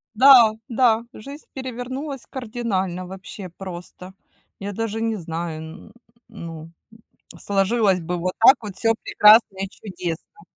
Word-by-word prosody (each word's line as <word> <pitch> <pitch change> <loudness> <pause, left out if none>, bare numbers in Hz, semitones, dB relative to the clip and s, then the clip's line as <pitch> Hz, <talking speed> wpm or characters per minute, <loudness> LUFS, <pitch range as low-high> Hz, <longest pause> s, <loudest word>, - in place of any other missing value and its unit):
Да 245 -3 +8 0.2
да, 235 -1 +3
жизнь 280 +7 -11
перевернулась 260 +2 -6
кардинально. 215 -8 -3
Вообще 190 0 -9
просто, 180 +1 -10 0.5
я 200 +1 -5
даже 225 +1 -3
не 225 -1 0
знаю. 165 -2 -5
Н 160 +4 -11 0.4
ну, 165 -6 -9 0.2
м, 225 0 -19
сложилось 200 -1 +1
бы 175 +2 -3
вот 180 +2 -2
так 260 +5 +8
вот 205 -3 -8
всё 225 +1 +2
прекрасно 210 -2 +5
и 195 0 -3
чудесно. 180 - -7
205 Hz, 130 wpm, -22 LUFS, 180-230 Hz, 0.5 s, Да